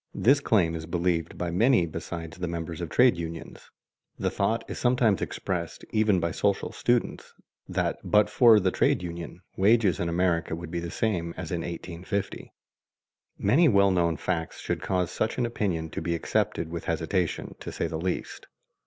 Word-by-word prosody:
This 135 Hz, +4 st, +4 dB
claim 95 Hz, -11 st, +2 dB
is 80 Hz, -1 st, -5 dB
believed 85 Hz, -1 st, -1 dB
by 90 Hz, -1 st, -2 dB
many 110 Hz, +1 st, +4 dB
besides 80 Hz, 0 st, -6 dB
the 90 Hz, -, -2 dB
members 85 Hz, -1 st, -5 dB
of 85 Hz, -, -4 dB
trade 125 Hz, -3 st, +5 dB
unions. 85 Hz, -1 st, -7 dB, 0.5 s
The -, -, -1 dB
thought 110 Hz, +4 st, 0 dB
is -, -, -6 dB
sometimes 120 Hz, -6 st, +2 dB
expressed 85 Hz, -3 st, -4 dB
even 110 Hz, -3 st, +3 dB
by 85 Hz, 0 st, -1 dB
social 100 Hz, +4 st, 0 dB
students 120 Hz, -1 st, -1 dB, 0.3 s
that -, -, -1 dB
but 105 Hz, 0 st, +4 dB
for 115 Hz, -4 st, +6 dB
the 95 Hz, -2 st, +1 dB
trade 90 Hz, -, +2 dB
unions 85 Hz, 0 st, -7 dB, 0.2 s
wages 100 Hz, -3 st, +3 dB
in 85 Hz, -, -1 dB
America 85 Hz, -1 st, 0 dB
would 85 Hz, 0 st, -8 dB
be 85 Hz, -, -2 dB
the 85 Hz, 0 st, -5 dB
same 85 Hz, -5 st, -1 dB
as 95 Hz, -4 st, -6 dB
in 85 Hz, -2 st, -1 dB
1850. 90 Hz, +3 st, -5 dB, 0.9 s
Many 165 Hz, +6 st, +4 dB
well 100 Hz, -3 st, +4 dB
known 85 Hz, -3 st, +1 dB
facts 80 Hz, 0 st, -3 dB
should -, -, -3 dB
cause 90 Hz, -2 st, -1 dB
such 110 Hz, -, -1 dB
an 125 Hz, -, +1 dB
opinion 90 Hz, -9 st, -2 dB
to -, -, -4 dB
be 85 Hz, +1 st, -1 dB
accepted 95 Hz, -1 st, -1 dB
with 85 Hz, -1 st, -5 dB
hesitation, 85 Hz, +1 st, -1 dB
to -, -, -7 dB
say -, -, -2 dB
the 80 Hz, -1 st, -3 dB
least. 90 Hz, 0 st, -4 dB
90 Hz, 175 wpm, -27 LUFS, 85-105 Hz, 0.9 s, for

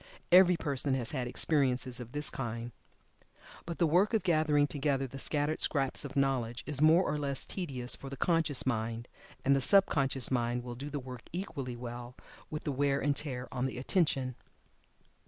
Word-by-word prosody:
Every 180 Hz, -1 st, +7 dB
person 140 Hz, -3 st, 0 dB
has 120 Hz, -3 st, -3 dB
had 130 Hz, -4 st, -2 dB
experiences 130 Hz, -2 st, +1 dB
of 120 Hz, -1 st, -8 dB
this 145 Hz, +1 st, +1 dB
kind. 115 Hz, -1 st, -5 dB, 1.0 s
But 170 Hz, -, -4 dB
the 170 Hz, -, +3 dB
work 180 Hz, +8 st, +3 dB
of 215 Hz, -, +1 dB
gathering 155 Hz, -4 st, +3 dB
together 140 Hz, -1 st, -1 dB
the 135 Hz, +1 st, -8 dB
scattered 150 Hz, +2 st, -1 dB
scraps 135 Hz, -3 st, 0 dB
of 140 Hz, -, -8 dB
knowledge 130 Hz, -4 st, 0 dB
is 145 Hz, -1 st, -3 dB
more 160 Hz, +4 st, +6 dB
or 150 Hz, -, -1 dB
less 140 Hz, -2 st, -3 dB
tedious 135 Hz, -10 st, +2 dB
for 135 Hz, -, -9 dB
the 140 Hz, -, -7 dB
conscious 160 Hz, -5 st, +1 dB
mind, 115 Hz, -1 st, -2 dB, 0.4 s
and 140 Hz, +1 st, +5 dB
the 135 Hz, -, +1 dB
sub 195 Hz, +8 st, +6 dB
conscious 135 Hz, -3 st, -1 dB
mind 120 Hz, -1 st, 0 dB
will 120 Hz, 0 st, -6 dB
do 135 Hz, +5 st, -7 dB
the 145 Hz, 0 st, -4 dB
work 125 Hz, -2 st, -10 dB
equally 140 Hz, -, -5 dB
well 120 Hz, 0 st, -8 dB, 0.3 s
with 155 Hz, -, -5 dB
the 145 Hz, -, -2 dB
wear 140 Hz, 0 st, +1 dB
and 145 Hz, 0 st, +1 dB
tear 130 Hz, -4 st, -5 dB
on 130 Hz, 0 st, -1 dB
the 130 Hz, -, -6 dB
attention. 135 Hz, -2 st, 0 dB
135 Hz, 185 wpm, -31 LUFS, 125-150 Hz, 1.0 s, Every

